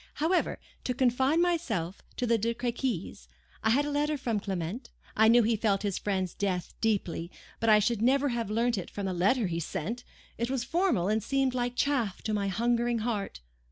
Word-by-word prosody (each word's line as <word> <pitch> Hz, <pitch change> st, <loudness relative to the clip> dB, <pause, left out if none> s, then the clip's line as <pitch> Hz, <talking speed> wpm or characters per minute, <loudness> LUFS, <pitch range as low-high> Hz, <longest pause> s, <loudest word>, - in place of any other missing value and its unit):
However, 330 Hz, +5 st, +1 dB, 0.3 s
to 250 Hz, -, -1 dB
confine 265 Hz, +5 st, +3 dB
myself 225 Hz, -, -1 dB, 0.2 s
to 250 Hz, -, 0 dB
the 230 Hz, -1 st, +2 dB
De 230 Hz, +2 st, 0 dB
Crequys. 235 Hz, -, -3 dB, 0.4 s
I 220 Hz, -, +3 dB
had 275 Hz, +6 st, +3 dB
a 295 Hz, -, -2 dB
letter 295 Hz, +1 st, 0 dB
from 235 Hz, -6 st, -1 dB
Clement; 195 Hz, +4 st, -4 dB, 0.3 s
I 220 Hz, +1 st, +5 dB
knew 235 Hz, +1 st, +6 dB
he 225 Hz, +1 st, +2 dB
felt 210 Hz, -2 st, +1 dB
his 200 Hz, -3 st, -1 dB
friend's 190 Hz, -4 st, -1 dB
death 185 Hz, -3 st, -2 dB
deeply; 190 Hz, -6 st, 0 dB, 0.3 s
but 225 Hz, -, +1 dB
I 215 Hz, -, +8 dB
should 215 Hz, +1 st, +1 dB
never 275 Hz, +4 st, +3 dB
have 235 Hz, -4 st, -2 dB
learnt 230 Hz, 0 st, +1 dB
it 180 Hz, -, -7 dB
from 200 Hz, -, -5 dB
the 190 Hz, -, -1 dB
letter 205 Hz, +7 st, +2 dB
he 170 Hz, -2 st, -2 dB
sent. 215 Hz, +9 st, -4 dB, 0.4 s
It 235 Hz, +1 st, -1 dB
was 260 Hz, -2 st, -1 dB
formal, 335 Hz, -, +1 dB
and 215 Hz, +2 st, +1 dB
seemed 270 Hz, +3 st, +1 dB
like 245 Hz, -1 st, -1 dB
chaff 245 Hz, -9 st, 0 dB
to 215 Hz, -, -1 dB
my 200 Hz, -1 st, 0 dB
hungering 235 Hz, +4 st, +1 dB
heart. 205 Hz, -, -3 dB
230 Hz, 195 wpm, -29 LUFS, 200-255 Hz, 0.4 s, I